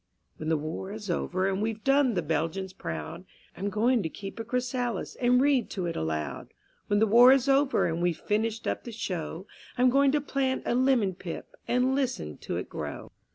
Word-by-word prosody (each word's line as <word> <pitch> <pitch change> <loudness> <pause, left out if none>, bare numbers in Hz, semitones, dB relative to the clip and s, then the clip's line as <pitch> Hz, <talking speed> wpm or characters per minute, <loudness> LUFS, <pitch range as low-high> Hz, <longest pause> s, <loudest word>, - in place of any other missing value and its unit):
_When 155 - -3
the 160 - +3
War 160 +6 -5
is 210 -3 -5
over 185 +2 0
and 195 +1 -1
we've 220 0 -2
done 275 -4 +3
the 175 - 0
Belgians 165 +5 -2
proud, 170 -2 -6 0.3
I'm 200 - -2
going 230 +4 +2
to 160 - -2
keep 195 +6 -8
a - - -2
chrysalis 245 -2 -2
and 250 0 +3
read 275 -2 +3
to 185 -4 -3
it 170 - -3
aloud; 80 -2 -4 0.3
When 205 - +2
the 220 - +5
War 240 +4 +8
is 270 0 +4
over 275 0 +3
and 165 +1 -1
we've 175 -2 +1
finished 220 +3 -1
up - - -2
the 240 - -7
show, 180 -5 -4 0.3
I'm 250 0 +4
going 275 +1 +4
to 300 - +3
plant 270 -2 -1
a - - +1
lemon 250 -6 +3
pip 175 -1 -8
and 250 +2 +2
listen 240 - -2
to - - -4
it - - -4
grow. - - -6
215 Hz, 200 wpm, -28 LUFS, 175-250 Hz, 0.3 s, War